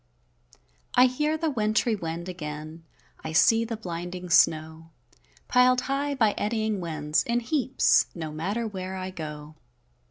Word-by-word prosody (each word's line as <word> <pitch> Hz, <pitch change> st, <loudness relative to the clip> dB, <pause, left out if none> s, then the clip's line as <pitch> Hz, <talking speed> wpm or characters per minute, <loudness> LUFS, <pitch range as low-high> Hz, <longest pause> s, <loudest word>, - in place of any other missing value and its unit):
I 250 Hz, -, +7 dB
hear 300 Hz, +5 st, 0 dB
the 320 Hz, -1 st, -1 dB
wintry 220 Hz, -1 st, +1 dB
wind 170 Hz, -2 st, -5 dB
again, 155 Hz, -2 st, -7 dB, 0.4 s
I 160 Hz, -, -5 dB
see 225 Hz, +7 st, +5 dB
the 225 Hz, -1 st, -4 dB
blinding 180 Hz, -2 st, -6 dB
snow, 160 Hz, -1 st, +2 dB, 0.6 s
Pil'd 250 Hz, 0 st, +4 dB
high, 280 Hz, +1 st, -2 dB
by 220 Hz, -5 st, +3 dB
eddying 215 Hz, -1 st, -1 dB
winds, 155 Hz, -3 st, 0 dB
in 235 Hz, 0 st, 0 dB
heaps, 260 Hz, +2 st, +2 dB
No 160 Hz, -3 st, -5 dB
matter 195 Hz, +10 st, -2 dB
where 190 Hz, -2 st, -6 dB
I 185 Hz, 0 st, -5 dB
go. 150 Hz, -3 st, -8 dB
190 Hz, 135 wpm, -26 LUFS, 160-235 Hz, 0.6 s, I